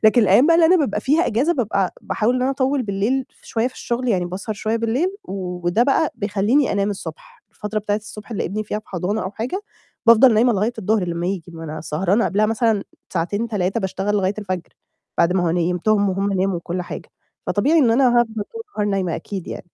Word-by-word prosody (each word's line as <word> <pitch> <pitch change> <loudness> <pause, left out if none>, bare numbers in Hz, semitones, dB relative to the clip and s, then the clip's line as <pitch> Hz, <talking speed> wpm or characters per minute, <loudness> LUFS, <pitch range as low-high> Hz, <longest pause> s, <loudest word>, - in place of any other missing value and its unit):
لكن 220 +3 +6
الأيّام 210 +7 +5
بقى 335 - +5
أنا 340 +2 +6
بابقى 265 - 0
فيها 305 +9 +2
أجازة، 250 +10 +2
بابقى 220 -6 -1
ع - - -1
باحاول 230 +3 0
إن 250 - 0
أنا 260 - +2
أطوّل 270 0 0
بالليل 215 +6 0
ف - - -28
شوية 230 +2 0
في 255 - -20
الشغل، 245 +1 -3
يعني 185 -6 +1
باسهر 190 +5 -4
شوية 220 +2 -1
بالليل، 230 +9 0 0.2
وده 180 +1 -1
بقى 280 +4 +2
بيخلّيني 210 +7 +1
أنام 200 +1 +1
الصبح، 485 - -8
الفترة 215 0 -4
بتاعة 205 0 -1
الصبح، 210 +1 -10
اللي 220 - -2
ابني 215 +4 -3
فيها 210 0 -3
في 215 - -15
حضانة 190 +4 -2
أو 185 - -3
حاجة، 240 - -3 0.5
بافضل 230 +1 +7
نايمة 235 +3 +4
لغاية 210 +3 0
الضهر 215 -1 +1
لمّا 170 0 -2
ييجي، 180 -3 -3
ما 165 0 -8
أنا 155 0 -6
سهرانة 185 +8 +1
قبلها 210 +2 +2
مثلًا 225 -2 +1 0.3
ساعتين، 200 +6 -1
3 200 0 -1
باشتغل 190 +1 -1
لغاية 195 0 +1
الفجر، 185 -4 -4 0.5
بعد 170 - +4
ما 185 -1 +1
هو - - +2
نيمتهم، 180 +5 +1
وهُم 195 +2 -1
ناموا، 190 -1 +1
وكلّ 175 +1 -4
حاجة. - - -8 0.4
فطبيعي 290 +11 +2
إن 250 -7 +4
أنا 255 +2 +4
هافضل 225 -2 -2
طول 455 0 -6
النهار 210 -1 0
نايمة 185 -4 -1
أكيد 190 +2 -6
يعني. - - -6
210 Hz, 215 wpm, -21 LUFS, 190-240 Hz, 0.5 s, بافضل